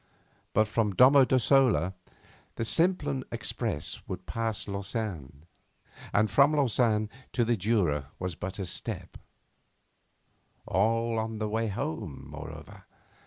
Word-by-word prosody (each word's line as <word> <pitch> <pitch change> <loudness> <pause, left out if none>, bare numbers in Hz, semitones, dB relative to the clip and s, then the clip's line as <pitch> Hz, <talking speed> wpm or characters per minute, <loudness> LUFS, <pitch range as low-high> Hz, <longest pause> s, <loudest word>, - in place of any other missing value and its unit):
But 110 +1 +3
from 105 -3 0
Domo 135 +3 +7
Dossola 125 - +3 0.6
the 115 - -2
Simplon 145 -3 +1
Express 115 -7 -3
would - - -6
pass 115 -2 -3
Lausanne, 100 - -5 0.7
and 110 +2 +3
from 140 +6 +4
Lausanne 115 -6 +2 0.3
to 120 - +2
the 120 +1 +2
Jura 90 -9 +1
was 90 -1 -3
but 95 +3 -6
a 95 - -3
step 90 - -6 1.5
all 115 +4 +1
on 110 0 -3
the 110 0 -2
way 110 +2 -1
home, 80 -7 -4
moreover. - - -10
110 Hz, 120 wpm, -29 LUFS, 95-120 Hz, 1.5 s, Domo